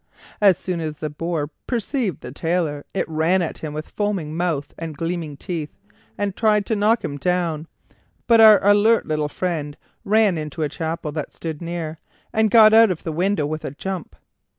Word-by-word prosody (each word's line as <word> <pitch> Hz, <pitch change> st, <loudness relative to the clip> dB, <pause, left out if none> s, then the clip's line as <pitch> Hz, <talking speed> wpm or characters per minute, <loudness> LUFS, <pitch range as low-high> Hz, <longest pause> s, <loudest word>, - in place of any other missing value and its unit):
As 195 Hz, -4 st, +6 dB
soon 180 Hz, -3 st, -3 dB
as 155 Hz, -1 st, -4 dB
the 155 Hz, 0 st, -5 dB
boar 155 Hz, -1 st, -3 dB, 0.2 s
perceived 235 Hz, -, -2 dB
the 125 Hz, -, -8 dB
Tailor 160 Hz, -1 st, -1 dB
it 195 Hz, -, -2 dB
ran 165 Hz, +3 st, +1 dB
at 160 Hz, -, -5 dB
him 155 Hz, -, -5 dB
with 155 Hz, +1 st, -7 dB
foaming 195 Hz, -7 st, -2 dB
mouth 165 Hz, -5 st, -2 dB
and 160 Hz, -3 st, -6 dB
gleaming 165 Hz, -3 st, -3 dB
teeth, 165 Hz, -4 st, -5 dB, 0.4 s
and 200 Hz, -2 st, -2 dB
tried 210 Hz, -2 st, +2 dB
to 220 Hz, -, 0 dB
knock 215 Hz, +3 st, +2 dB
him 145 Hz, -, -4 dB
down; 170 Hz, -1 st, -1 dB, 0.6 s
but 230 Hz, -1 st, +6 dB
our 215 Hz, -2 st, +9 dB
alert 205 Hz, +2 st, +4 dB
little 150 Hz, -1 st, -1 dB
friend 150 Hz, -3 st, -3 dB, 0.3 s
ran 210 Hz, -4 st, +3 dB
into 155 Hz, +1 st, -4 dB
a 150 Hz, -, -1 dB
chapel 160 Hz, 0 st, -4 dB
that 150 Hz, 0 st, -5 dB
stood 160 Hz, -2 st, -6 dB
near, 165 Hz, -2 st, -5 dB, 0.3 s
and 220 Hz, -1 st, +3 dB
got 215 Hz, 0 st, +7 dB
out 225 Hz, 0 st, +7 dB
of 180 Hz, -3 st, -3 dB
the 165 Hz, -, -3 dB
window 180 Hz, 0 st, 0 dB
with 155 Hz, +1 st, -4 dB
a -, -, -3 dB
jump. 180 Hz, +5 st, -6 dB
170 Hz, 185 wpm, -22 LUFS, 155-205 Hz, 0.6 s, our